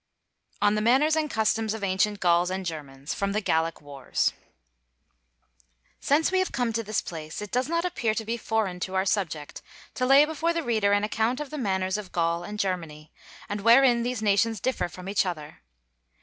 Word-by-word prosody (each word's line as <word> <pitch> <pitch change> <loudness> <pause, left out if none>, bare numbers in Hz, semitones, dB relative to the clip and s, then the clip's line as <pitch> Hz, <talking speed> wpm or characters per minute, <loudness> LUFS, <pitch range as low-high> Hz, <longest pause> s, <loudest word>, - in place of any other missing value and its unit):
ON 205 0 +4
THE 215 - 0
MANNERS 270 +8 +4
AND 310 -1 0
CUSTOMS 220 -1 0
OF 220 - -7
ANCIENT 195 +2 +1
GAULS 175 -1 +3
AND 190 0 -3
GERMANS 145 -4 -6
From 200 0 -2
'The 215 - 0
Gallic 165 -3 0
Wars' 140 -2 -1 1.7
Since 305 +5 +2
we 375 - +2
have 375 - 0
come 245 -3 -1
to 230 - 0
this 215 -1 -2
place, 155 -2 -7
it 210 -1 -7
does 250 +3 0
not 335 +1 0
appear 235 -11 -1
to 220 - -3
be 230 +2 -1
foreign 220 -5 -2
to 185 +1 -4
our 190 0 +1
subject 165 -7 -2 0.3
to 255 - -1
lay 275 +3 +7
before 320 +2 -1
the 335 -1 -2
reader 220 -5 +1
an 205 0 +2
account 225 +4 0
of 300 -2 -6
the 305 - -5
manners 190 -3 -1
of 195 -3 -9
Gaul 170 0 0
and 210 +4 -6
Germany, 165 -6 -3 0.4
and 205 0 -4
wherein 240 +2 +5
these 245 -2 -2
nations 215 +1 +2
differ 260 -3 -1
from 180 +2 -10
each 200 +1 +2
other. 155 -5 -6
210 Hz, 195 wpm, -26 LUFS, 180-240 Hz, 1.7 s, lay